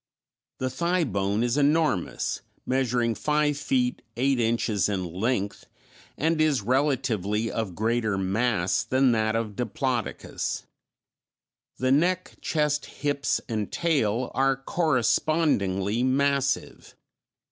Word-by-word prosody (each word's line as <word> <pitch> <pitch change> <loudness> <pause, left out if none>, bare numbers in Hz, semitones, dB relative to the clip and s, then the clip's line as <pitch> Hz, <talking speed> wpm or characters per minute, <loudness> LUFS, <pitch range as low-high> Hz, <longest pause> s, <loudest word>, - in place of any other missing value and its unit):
The 130 0 -2
thigh 170 +6 +1
bone 100 -4 0
is 120 +3 0
enormous, 145 - +1 0.2
measuring 125 -3 +1
five 150 +4 +1
feet 130 -3 0 0.2
eight 135 +1 +2
inches 110 -4 +1
in 95 -3 -1
length, 100 +4 -2 0.5
and 160 +2 +1
is 150 -8 +2
relatively 115 -5 0
of 105 -6 -3
greater 110 -1 0
mass 95 -1 +1
than 130 0 +3
that 110 -1 +1
of 110 -3 -2
Diplodocus. 125 +1 -3 1.1
The 130 0 +1
neck, 180 +6 +1
chest, 150 -1 0
hips, 145 -1 -1
and 110 -4 -3
tail 130 -8 0
are 135 0 +2
correspondingly 130 - +1
massive. 140 +1 0
125 Hz, 105 wpm, -26 LUFS, 110-140 Hz, 1.1 s, than